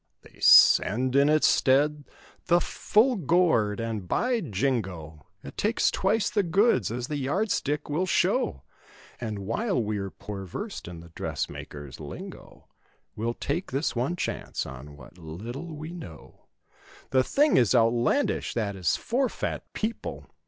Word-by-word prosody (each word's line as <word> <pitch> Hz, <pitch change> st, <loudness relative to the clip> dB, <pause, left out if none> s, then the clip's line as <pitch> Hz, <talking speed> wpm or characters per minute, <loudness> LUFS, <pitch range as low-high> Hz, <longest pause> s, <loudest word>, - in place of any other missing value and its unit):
They -, -, -19 dB
send, 125 Hz, +6 st, +6 dB
in 140 Hz, +1 st, +5 dB
its 155 Hz, 0 st, +4 dB
stead, 145 Hz, +2 st, +3 dB, 0.4 s
the 175 Hz, 0 st, +5 dB
"full 225 Hz, +8 st, +2 dB
gored" 160 Hz, -, +2 dB
and 110 Hz, -5 st, -4 dB
"By 245 Hz, -, 0 dB
Jingo!" 95 Hz, -, -3 dB, 0.2 s
It -, -, -10 dB
takes 215 Hz, +3 st, +1 dB
twice 205 Hz, +2 st, +1 dB
the 210 Hz, -, +1 dB
goods 190 Hz, -, +2 dB
as 120 Hz, +2 st, -3 dB
the 150 Hz, -, -3 dB
yard 180 Hz, +11 st, -1 dB
stick 145 Hz, +1 st, -1 dB
will 165 Hz, +6 st, -1 dB
show. 65 Hz, -, +1 dB, 0.6 s
And 105 Hz, -4 st, -5 dB
while 195 Hz, -, -1 dB
we're 105 Hz, -3 st, -2 dB
poor 100 Hz, 0 st, -8 dB
versed 200 Hz, -, -6 dB
in 85 Hz, -2 st, -8 dB
the 85 Hz, -, -14 dB
dressmaker's 70 Hz, -3 st, -6 dB
lingo -, -, -10 dB, 0.5 s
We'll 115 Hz, +2 st, -2 dB
take 160 Hz, +7 st, -3 dB
this 135 Hz, +3 st, -1 dB
one 130 Hz, +9 st, -1 dB
chance 175 Hz, 0 st, -3 dB
on 70 Hz, +3 st, -10 dB
what 75 Hz, +6 st, -15 dB
little 120 Hz, -, -7 dB
we 155 Hz, +2 st, -7 dB
know; 85 Hz, -, -11 dB, 0.7 s
"The 130 Hz, -1 st, +4 dB
thing 295 Hz, -, +3 dB
is 120 Hz, 0 st, +4 dB
out 115 Hz, -1 st, +4 dB
landish, 120 Hz, -, 0 dB
that 105 Hz, -4 st, -1 dB
is 90 Hz, -3 st, +1 dB
for 255 Hz, +2 st, 0 dB
fat -, -, -5 dB
people! 225 Hz, +1 st, -4 dB
130 Hz, 150 wpm, -27 LUFS, -, 0.7 s, send